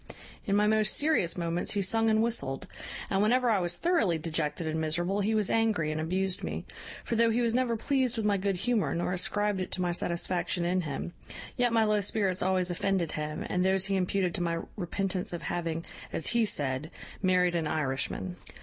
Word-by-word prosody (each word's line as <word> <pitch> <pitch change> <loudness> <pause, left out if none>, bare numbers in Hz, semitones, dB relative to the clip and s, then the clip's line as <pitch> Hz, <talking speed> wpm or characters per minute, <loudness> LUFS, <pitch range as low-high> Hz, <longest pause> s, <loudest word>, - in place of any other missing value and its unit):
In 200 - +2
my 210 +1 +4
most 215 -1 +3
serious 290 - +2
moments 170 0 0
he 205 - 0
sung 225 +4 +3
and 220 0 +3
whistled; 225 - -2 0.5
and 195 0 +2
whenever 240 +3 +3
I 210 - +3
was 175 -1 -1
thoroughly 330 - +2
dejected 160 0 -2
and 160 0 -1
miserable 175 +6 0
he 215 +2 +1
was 210 -3 +2
angry, 220 -9 +1
and 155 0 -2
abused 185 +3 -1
me: - - -4 0.4
for, 235 - -1
though 230 0 +4
he 230 +2 +1
was 230 -1 +1
never 240 -2 +1
pleased 255 -1 0
with 220 - -1
my 205 -1 +3
good 195 0 0
humour, 210 - 0
nor 175 +1 -1
ascribed 205 +2 0
it 185 - -3
to 185 - -1
my 175 - +1
satisfaction 175 0 -1
in 180 +1 +1
him, 155 +2 -5 0.4
yet 245 -1 +2
my 225 -1 +4
low 210 -1 +2
spirits 195 -2 0
always 185 -1 +1
offended 180 -1 0
him, 150 0 -4
and 180 - 0
those 190 0 +3
he 195 0 +1
imputed 185 -1 0
to 190 - -2
my 170 -1 -1
repentance 185 -1 -2
of 175 - -5
having 165 -1 -3 0.3
(as - - -1
he 235 -1 +3
said) 145 -5 0 0.3
married 180 -2 +3
an 165 -3 0
Irishman. 150 +5 -2
185 Hz, 205 wpm, -29 LUFS, 170-215 Hz, 0.5 s, my